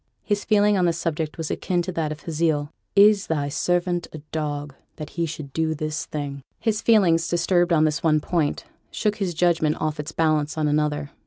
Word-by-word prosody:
His 205 -1 -1
feeling 210 -1 +3
on 180 - +3
the 170 - +2
subject 160 -2 -3
was 160 -2 -3
akin 175 -2 -1
to 185 - -4
that 160 -3 -2
of 155 - -7
Hazael, 155 -2 0 0.2
'Is 205 0 +6
thy 145 -3 -1
servant 175 +3 0
a - - -7
dog 145 -2 -3 0.2
that 150 -1 -8
he 170 -1 -1
should 145 -3 -7
do 160 -1 0
this 155 0 -3
thing?' 140 -2 -5 0.2
His 220 -2 0
feelings, 175 -7 +4
disturbed 175 0 +2
on 155 -2 +4
this 155 +1 +1
one 155 -2 +3
point, 155 -1 -1 0.3
shook 210 -1 -1
his 190 -5 -2
judgment 160 -3 +2
off 155 0 -2
its 150 +1 -4
balance 155 -2 +1
on 155 -1 +1
another. 150 -1 0
160 Hz, 195 wpm, -24 LUFS, 150-175 Hz, 0.3 s, Is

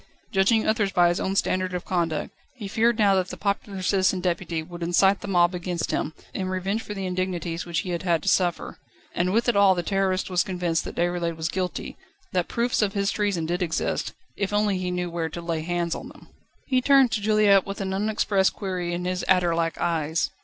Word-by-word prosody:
Judging 215 +2 +3
others 215 -3 +1
by 175 -1 +4
his 175 - 0
own 190 - -1
standard 185 -1 0
of 180 - -4
conduct, 165 -4 -1 0.2
he 215 -6 -6
feared 230 +3 +2
now 205 -2 +4
that 185 -1 +1
the - - -7
popular 200 -1 -2
Citizen 190 0 +2
Deputy 175 -2 -2
would 175 +1 -10
incite 190 +3 +3
the - - -6
mob 175 -2 +3
against 175 -1 -3
him, 155 - -2 0.2
in 185 -1 -3
revenge 190 +4 -1
for 210 - -7
the 195 -1 -4
indignities 180 -2 -3
which 170 0 -1
he 185 - -5
had 170 - -2
had 170 -4 +1
to - - -7
suffer. 180 -3 +1 0.3
And 180 +1 0
with 230 +4 +1
it 240 - +3
all 200 -2 +5
the 175 - -2
Terrorist 190 0 0
was 180 -1 +1
convinced 175 -3 -1
that - - -7
Déroulède 175 -1 -1
was 160 0 -2
guilty, 185 0 -4 0.4
that 180 -2 +1
proofs 235 0 0
of 205 -2 +1
his 200 -1 0
treason 200 -6 -1
did 175 +3 -2
exist, 165 -2 -1 0.2
if 200 -1 -2
only 205 -2 +1
he 180 -1 -2
knew 180 -1 -2
where 165 -1 -2
to 170 - -7
lay 170 -2 -2
hands 170 0 -1
on - - -7
them. - - -16 0.4
He 255 -1 +1
turned 270 -2 +5
to 210 - -1
Juliette 210 -2 +4
with 195 - -5
an 190 -1 -2
unexpressed 200 -1 +1
query 180 -3 -3
in 180 +1 -4
his 180 0 -2
adder 180 -3 +3
like 165 -1 -1
eyes. 160 -1 0
185 Hz, 220 wpm, -25 LUFS, 175-200 Hz, 0.4 s, all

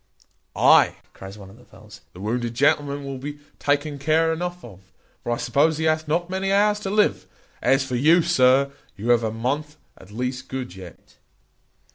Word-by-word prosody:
"Ay," - - +5 0.2
cries 95 +1 -11
one 95 -2 -12
of 110 - -17
the - - -18
fellows, 105 -1 -16
"the 90 - -13
wounded 120 +3 -3
gentleman 145 +1 +1
will 135 -1 -6
be 145 +2 -7 0.2
taken 145 0 -1
care 160 +3 +2
enough 175 0 -5
of; 95 -5 -13 0.4
for 120 - -4
I 120 - 0
suppose 150 +7 +1
he 160 - -2
hath 155 0 +1
not 170 +3 0
many 190 +1 -2
hours 210 +1 +3
to 195 - -5
live. 210 +1 +1 0.3
As 135 0 +2
for 125 -2 -4
you, 160 +7 +4
sir, 130 +1 +3 0.3
you 110 +4 -4
have 120 -1 +4
a 110 - -1
month 140 +7 -3 0.2
at 95 - -17
least 125 +4 -4
good 130 -8 -6
yet." 90 -3 -14
140 Hz, 185 wpm, -23 LUFS, 120-160 Hz, 0.4 s, Ay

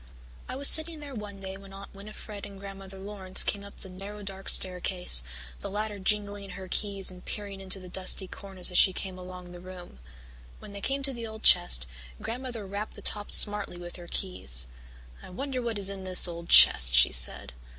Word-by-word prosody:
I - - -6
was 280 +1 +4
sitting 315 0 +7
there 290 -2 -11
one 205 -3 -10
day 190 0 -9
when 195 0 -16
Aunt 195 0 -14
Winnifred 205 0 -12
and 200 -1 -15
Grandmother 195 -1 -13
Laurance 190 -1 0
came 200 -1 -5
up 200 - -15
the - - -9
narrow 200 +3 -10
dark 195 0 -9
staircase, 180 - +3 0.4
the - - -9
latter 210 0 -6
jingling 205 0 -4
her 190 -1 -11
keys 195 0 +1
and 180 0 -15
peering 200 -2 -8
into 190 0 -4
the 185 - -14
dusty 190 +1 0
corners 190 -1 -5
as 180 - +2
she 190 - +3
came 185 0 -7
along 180 -1 -13
the 175 - -13
room. 180 - -14 0.6
When 205 - -14
they 200 - -10
came 275 +5 -4
to 270 0 -3
the 235 -2 -9
old 220 0 -13
chest, 175 - +4 0.3
Grandmother 240 -2 -8
rapped 200 +2 -9
the - - -13
top 205 -1 -4
smartly 205 -4 +2
with 175 0 -12
her 175 -1 -14
keys. 65 - 0 0.6
"I - - -15
wonder 260 +6 -7
what 230 -3 -5
is 200 -1 0
in 195 -1 -10
this 185 -1 +4
old 170 0 -10
chest," 60 0 +7
she - - +4
said. - - -1
195 Hz, 200 wpm, -25 LUFS, 185-210 Hz, 0.6 s, sitting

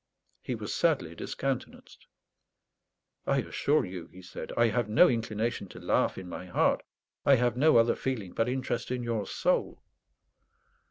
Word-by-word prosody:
He - - -3
was - - -5
sadly - - +1
discountenanced. 135 -2 -5 1.2
"I - - +3
assure 150 +2 +1
you," 90 -3 -7
he 95 +1 -14
said, 90 - -8
"I 120 -1 +5
have 115 0 -1
no 115 +12 +7
inclination 115 - -1
to - - -11
laugh - - +1
in 95 - -7
my 90 - -7
heart. 90 - +2 0.4
I 140 - +6
have 120 -1 +1
no 150 +2 +5
other 115 0 +5
feeling 115 -9 -3
but 115 +1 0
interest 125 -2 -2
in 125 -1 -2
your 115 -4 -2
soul." - - 0
115 Hz, 155 wpm, -29 LUFS, 105-125 Hz, 1.2 s, no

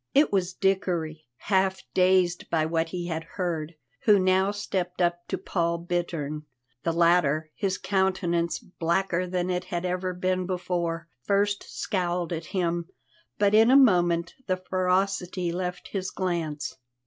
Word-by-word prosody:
It 285 -5 +4
was 185 -2 0
Dickory, 170 -6 -1
half 190 +1 +1
dazed 185 -1 +3
by 160 -2 +2
what 165 0 0
he 175 0 -4
had 165 -2 -3
heard, 170 -3 -2 0.3
who 210 -1 +7
now 190 +1 +3
stepped 190 -3 -3
up 175 -1 0
to - - -2
Paul 170 -2 -1
Bittern. 165 -4 -3 0.3
The 165 - 0
latter, 165 -3 +3
his 190 -2 -1
countenance 185 -3 0
blacker 180 +1 -1
than 180 0 -1
it 180 0 -2
had 180 -1 -3
ever 180 0 -2
been 185 0 0
before, 175 -2 -2
first 200 +6 +1
scowled 175 -3 -1
at 165 0 -4
him, 170 -1 -1 0.5
but 205 0 +3
in 220 +2 +6
a 265 - +7
moment 175 -9 +4
the 185 -1 +1
ferocity 185 -1 0
left 180 +1 -4
his 190 -2 -3
glance. 155 -7 -3
180 Hz, 145 wpm, -27 LUFS, 170-190 Hz, 0.5 s, who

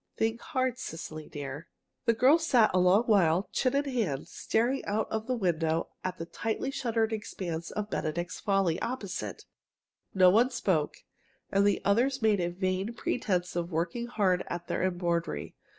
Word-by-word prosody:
Think 225 +1 0
hard, 260 -5 -1
Cecily 155 -4 -7
dear." 145 +1 -6 0.4
The 230 - +3
girl 270 +8 +5
sat 250 -10 +4
a 185 - +4
long 180 +5 +5
while, 190 -5 +3
chin 255 0 +1
in 285 +1 +2
hand, 220 - -1
staring 245 +5 0
out 210 +2 0
of 220 +1 -2
the 255 - +1
window 165 -5 0
at 185 - -3
the 165 - -5
tightly 225 +8 -3
shuttered 225 -4 0
expanse 175 -6 -4
of 210 0 -4
"Benedict's 170 +3 -2
Folly" 195 -5 +1
opposite. 235 -7 -4 0.7
No 185 -1 +7
one 235 +6 +4
spoke, 175 - -1 0.5
and 200 +1 +4
the 200 - +2
others 250 +7 +2
made 215 -3 +3
a 175 -1 0
vain 185 +4 -2
pretense 185 -8 -1
of 175 0 -2
working 175 +9 -2
hard 195 -6 +1
at 175 0 -5
their - - -1
embroidery. 170 - -1
195 Hz, 165 wpm, -29 LUFS, 175-230 Hz, 0.7 s, No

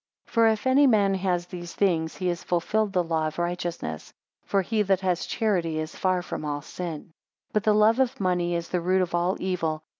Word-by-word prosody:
4 - - -23
For 230 -1 +5
if 220 +1 +1
any 270 +2 +5
man 205 -5 +4
has 180 -2 0
these 175 -1 -8
things, 165 -5 +1
he 185 - -4
has 175 -1 -3
fulfilled 200 +5 0
the 180 -2 +1
law 160 -2 0
of 155 - -6
righteousness: 175 - -3 0.3
for 195 -1 +1
he 220 +3 0
that 195 -2 +2
has 180 -2 0
charity 175 -8 0
is 155 +1 -4
far 185 -1 0
from 175 - -5
all 145 -1 -3
sin. 165 -2 -7 0.4
5 - - -40
But 215 - +1
the 215 -1 +4
love 215 +3 +4
of 260 -2 +1
money 180 -2 0
is 170 0 -3
the 180 - -1
root 185 +2 +2
of 175 - -5
all 175 +2 +1
evil. 165 -4 -2
180 Hz, 220 wpm, -26 LUFS, 170-200 Hz, 0.4 s, For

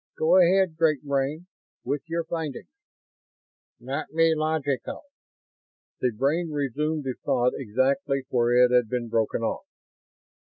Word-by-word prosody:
Go 165 +4 +4
ahead, 180 -2 +3
Great 155 -4 +2
Brain, 140 +4 -1 0.4
with 140 +3 -2
your 165 +1 -2
findings." 150 - -5 0.6
"... - - -67
not 130 +3 -4
be 165 0 +3
logical." 155 - -2 1.0
The 125 - +1
brain 145 +9 0
resumed 150 +1 -2
the 130 -1 -2
thought 125 -3 +1
exactly 135 - 0
where 120 0 +4
it 125 - 0
had 125 -3 +3
been 120 -1 -3
broken 115 0 0
off. 110 - -3
140 Hz, 130 wpm, -25 LUFS, 125-160 Hz, 1.0 s, Go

